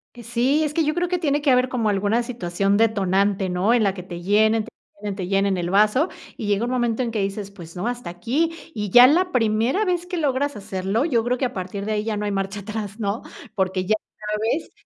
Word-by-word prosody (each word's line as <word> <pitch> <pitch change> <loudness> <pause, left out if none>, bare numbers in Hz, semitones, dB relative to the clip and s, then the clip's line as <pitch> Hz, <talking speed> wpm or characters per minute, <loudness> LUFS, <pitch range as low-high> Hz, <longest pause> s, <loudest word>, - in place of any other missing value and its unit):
Que 240 - -10
sí, 250 +6 +1
es 300 -1 -2
que 325 - +2
yo 305 0 +1
creo 350 +1 -1
que 360 0 0
tiene 295 -3 +1
que 285 -2 +3
haber 250 0 +3
como 235 -4 0
alguna 205 +4 +1
situación 200 -4 -1
detonante, 200 -3 +2
¿no? 180 +6 +2
En 240 -2 +3
la 195 -2 +2
que 180 - -8
te 175 -1 -8
llenen, 215 +4 +3
te 225 - -11 0.3
llenen, 205 -2 -3
te 185 -2 -4
llenen 195 0 +1
el 175 -1 -2
vaso 215 - +3 0.3
y 215 - -4
llega 205 +2 +1
un 245 - -3
momento 240 -1 0
en 235 - -2
que 220 -2 -1
dices: 195 0 -3
"Pues 170 -5 -12
no, 180 +6 -3
hasta 245 -6 -4
aquí". 260 - -1 0.2
Y 210 -4 -3
ya 245 +6 +9
la 360 +6 +2
primera 230 - +1
vez 355 -2 0
que 360 0 -3
logras 285 -2 0
hacerlo, 195 +4 -2
yo 240 -8 +1
creo 245 +2 0
que 260 - 0
a 245 - -3
partir 190 +2 -5
de 215 - -1
ahí 210 - -1
ya 215 -1 -2
no 210 - -2
hay 205 - -1
marcha 195 +1 -3
atrás, 210 0 -6
¿no? 205 +1 -2 0.3
Porque 185 -1 -1
ya 215 +3 +2 0.4
sabes 220 +9 -1
215 Hz, 245 wpm, -23 LUFS, 195-250 Hz, 0.4 s, ya